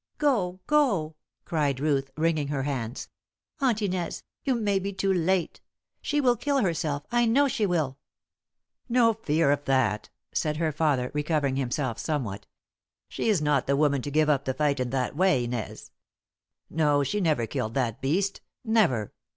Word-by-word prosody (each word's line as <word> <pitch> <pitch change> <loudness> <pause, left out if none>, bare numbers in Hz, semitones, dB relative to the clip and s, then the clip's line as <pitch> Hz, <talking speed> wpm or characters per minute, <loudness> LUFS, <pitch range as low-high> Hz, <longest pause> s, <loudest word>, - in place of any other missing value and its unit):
"Go! 205 -12 +1
Go!" 205 - +2 0.3
cried 145 -5 0
Ruth, 140 -2 0
wringing 155 -2 +1
her 140 -2 -2
hands. 125 -3 -3 0.5
"Aunt 240 -6 +1
Inez 180 -3 -2 0.2
you 265 -3 +1
may 205 -4 +1
be 200 +1 -3
too 195 0 0
late! 180 0 0 0.4
She 295 - 0
will 250 -4 +3
kill 280 +4 0
herself, 155 -6 -1
I 240 0 +3
know 280 +5 +4
she 220 -5 0
will!" 150 -7 -1 0.9
"No 235 -1 +4
fear 160 -8 +1
of 145 0 0
that," 125 -6 +1 0.2
said 150 -1 0
her 160 -1 0
father, 145 -5 0
recovering 150 -2 0
himself 130 -2 -2
somewhat. 110 -11 -3 0.6
"She - - -2
is 190 -8 +2
not 145 -3 +1
the 140 0 +2
woman 145 -2 +2
to 145 - -5
give 155 +1 +2
up 140 -2 +2
the 130 - -1
fight 145 -2 +1
in 125 -1 -1
that 130 +1 -1
way, 155 -7 +3
Inez. 120 -3 -5 0.8
No, 150 -2 +2
she 205 +10 -1
never 155 -9 +1
killed 110 0 -3
that 120 -5 -1
beast 185 +9 0 0.2
never!" 185 - +2
155 Hz, 165 wpm, -27 LUFS, 135-195 Hz, 0.9 s, know